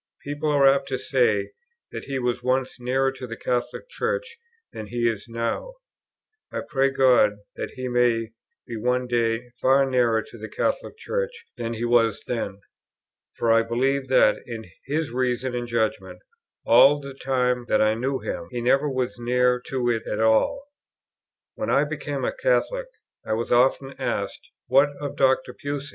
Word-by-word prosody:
People 145 +2 -2
are 140 -2 +5
apt 135 0 +3
to 135 -1 -2
say 110 -8 +1 0.4
that - - -6
he 135 -1 -3
was 125 -1 -1
once 130 +1 -1
nearer 135 +2 +1
to 130 -1 -8
the 115 0 -7
Catholic 125 - -2
Church 470 0 -3 0.4
than 110 - -7
he 120 +2 -4
is 110 -1 -2
now; 115 - -3 0.8
I - - -3
pray 135 0 +2
God 125 -6 +4 0.2
that - - -5
he 130 -1 -4
may 120 -2 +1 0.3
be 115 - -6
one 125 +3 0
day 120 0 0
far 135 +1 +4
nearer 120 -4 +2
to - - -14
the - - -7
Catholic - - -2
Church 485 0 -4
than 115 0 -4
he 115 +2 -2
was 115 -3 +2
then; 100 -5 -3 0.7
for 115 - +1
I 115 0 +5
believe 130 +4 0
that, 130 -4 +4
in 115 -2 -6 0.2
his 150 -1 -1
reason 125 0 -1
and 120 0 -3
judgment, 115 -2 -2 0.5
all 145 +1 +6
the 140 -1 -8
time 125 -2 0
that 110 - +2
I 110 0 +4
knew 130 +4 -1
him, - - -5
he 125 - -4
never 135 +5 +2
was 125 -5 -2
near 125 +1 +2
to 130 -2 -1
it 115 -2 -1
at 105 - -2
all. 110 - +2 0.9
When - - -4
I - - +4
became - - -3
a - - -1
Catholic, - - 0 0.4
I - - -2
was 115 +2 -2
often 135 +2 +3
asked, - - -3 0.2
"What 135 +4 +4
of 145 -1 -5
Dr. 130 -1 +2
Pusey?" 145 +1 -5
125 Hz, 170 wpm, -24 LUFS, 120-135 Hz, 0.9 s, all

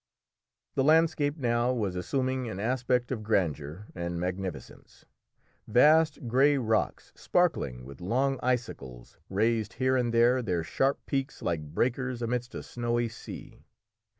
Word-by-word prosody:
The 135 - +1
landscape 155 -1 +3
now 120 -2 +1
was 105 -7 -1
assuming 130 +6 -1
an 100 - -5
aspect 125 +2 0
of 120 -4 -2
grandeur 90 -4 -1
and 85 -1 -4
magnificence. 90 -1 -6 0.6
Vast 150 +3 +4
grey 135 +5 +4
rocks, 110 -4 -1
sparkling 70 - 0
with 70 +3 -11
long 130 +8 0
icicles, 70 - -3
raised 110 +2 +1
here 130 0 +1
and 120 -2 +1
there 120 +2 +4
their 90 -7 -1
sharp 135 +11 0
peaks 135 +1 -3
like 80 -3 -3
breakers 125 +1 0
amidst 120 +2 -2
a - - -5
snowy 120 -1 -1
sea. 115 - -10
120 Hz, 130 wpm, -29 LUFS, 95-130 Hz, 0.6 s, Vast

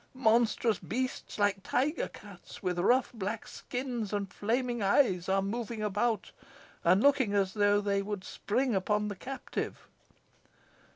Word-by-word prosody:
Monstrous 230 -3 +3
beasts, 255 +2 -3
like 205 -1 +2
tiger 290 - 0
cats, 200 -2 -13
with 180 -1 -1
rough 245 +8 +3
black 215 0 -4
skins 245 -5 -4
and 200 -2 -3
flaming 240 +2 -1
eyes, 195 -3 +3
are 195 0 +2
moving 225 +1 -3
about, 210 +1 0 0.5
and 185 +5 +4
looking 270 -7 +4
as 195 -1 +1
if 205 0 +3
they 200 -1 +1
would 200 -1 -4
spring 250 +6 -1
upon 210 +2 +1
the 205 - -4
captive. 265 +7 -5
210 Hz, 135 wpm, -31 LUFS, 200-240 Hz, 0.5 s, and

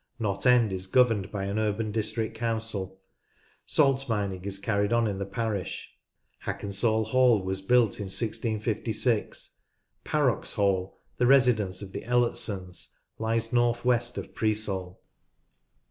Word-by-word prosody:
Knott 105 0 -1
End 120 -4 +5
is 95 0 -4
governed 110 -3 +2
by 100 -2 -3
an 100 +2 -2
urban 110 0 -1
district 110 +1 -1
council. 110 -5 -3 0.7
Salt 135 -3 +2
mining 100 -4 -2
is 100 -1 -2
carried 100 0 0
on 120 0 +3
in 100 -3 -2
the 100 - -3
parish. 100 -3 -4 0.5
Hackensall 110 +2 +1
Hall 120 -3 +3
was 95 +1 -2
built 115 +1 +3
in 100 - -3
1656. 110 +1 -1 0.4
Parrox - - 0
Hall, 95 -2 0 0.2
the 125 - +2
residence 115 -8 +3
of 95 - -9
the - - -5
Elletsons, 105 -6 0 0.3
lies 115 +1 -1
north 120 0 +2
west 120 -1 +1
of - - -6
Preesall. 100 -4 -1
110 Hz, 130 wpm, -27 LUFS, 100-120 Hz, 0.7 s, End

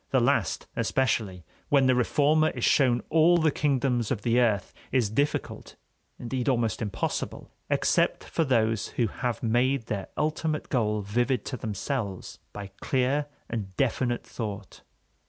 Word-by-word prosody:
The - - +3
last - - +1
especially, 105 -9 0 0.2
when 140 -2 +4
the 130 - +5
reformer 150 +5 +3
is - - -2
shown 125 -4 +3
all 165 +2 +5
the 160 -2 +3
kingdoms 130 -6 0
of 110 -6 -2
the 120 +1 +3
earth, 105 -6 +1 0.2
is 120 -6 +1
difficult, 145 +6 -2 0.4
indeed 125 +2 -2
almost 120 -4 0
impossible, 105 -3 -3 0.2
except - - +2
for 165 - -1
those 115 -6 +1
who 120 - +3
have 120 +3 -3
made 120 +2 +1
their 100 -4 -4
ultimate 155 0 -1
goal 105 -5 +1
vivid 120 +4 0
to 130 - -4
themselves 105 -1 -4
by 100 -1 -8
clear 135 +3 +1 0.2
and 100 -5 -5
definite 120 -2 0
thought. 105 -3 -6
120 Hz, 140 wpm, -27 LUFS, 110-140 Hz, 0.4 s, the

